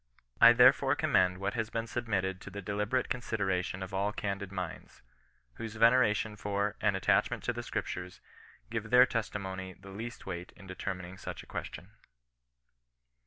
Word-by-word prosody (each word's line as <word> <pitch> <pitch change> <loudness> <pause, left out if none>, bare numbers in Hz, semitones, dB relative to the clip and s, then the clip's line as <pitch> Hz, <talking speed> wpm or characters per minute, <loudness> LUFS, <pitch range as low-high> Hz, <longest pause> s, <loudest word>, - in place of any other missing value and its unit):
I 120 0 +10
there 125 +2 +8
fore 135 0 0
commend 95 - +2
what 100 +2 -2
has 110 -2 -2
been 115 0 -2
submitted 100 -6 -2
to - - -8
the 100 +1 -7
deliberate 105 +6 -1
consideration 95 -6 -1
of 95 - -8
all 100 +2 0
candid 100 -2 -4
minds, 90 -8 -6 0.5
whose 115 -1 -6
veneration 110 -2 +4
for 105 0 -1
and 105 -2 +2
attachment 95 - +2
to - - 0
the - - -4
Scriptures 90 0 -4 0.5
give 110 -2 -3
their 125 +1 +8
testimony 95 -6 -4
i^he 95 0 -12
least 120 +3 -7
weight 85 +1 -6
in 95 - -14
determining 95 -1 -6
such - - -6
a - - -16
question. - - -7
100 Hz, 160 wpm, -31 LUFS, 95-115 Hz, 0.5 s, I